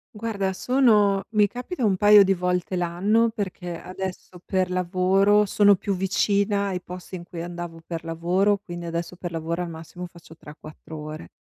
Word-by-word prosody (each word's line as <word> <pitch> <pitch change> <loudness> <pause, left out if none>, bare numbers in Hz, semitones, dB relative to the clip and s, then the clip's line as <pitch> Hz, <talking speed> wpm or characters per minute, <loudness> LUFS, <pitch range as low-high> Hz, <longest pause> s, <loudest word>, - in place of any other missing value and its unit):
Guarda 205 -3 -2
sono 210 -5 +3
mi 210 -2 +4
capita 250 - -5
un 195 -3 +2
paio 205 +1 +8
di 195 0 +2
volte 180 0 -1
l'anno 190 +7 +2
perché 180 -4 -5
adesso 185 -1 -7
per 185 -1 0
lavoro 190 +3 +3
sono 205 +1 +5
più 195 +1 -2
vicina 200 +2 +1
ai 185 -2 -2
posti 180 +1 -8
in 175 - -7
cui 170 -1 -8
andavo 175 -1 -7
per 165 -1 -6
lavoro, 175 +5 +1
quindi 175 -3 -8
adesso 170 +1 -4
per 175 -1 -6
lavoro 165 +2 -3
al 170 - -6
massimo 165 +2 -8
faccio 170 -2 -14
3-4 155 +1 -11
ore. 155 +1 -8
185 Hz, 170 wpm, -24 LUFS, 170-200 Hz, -, paio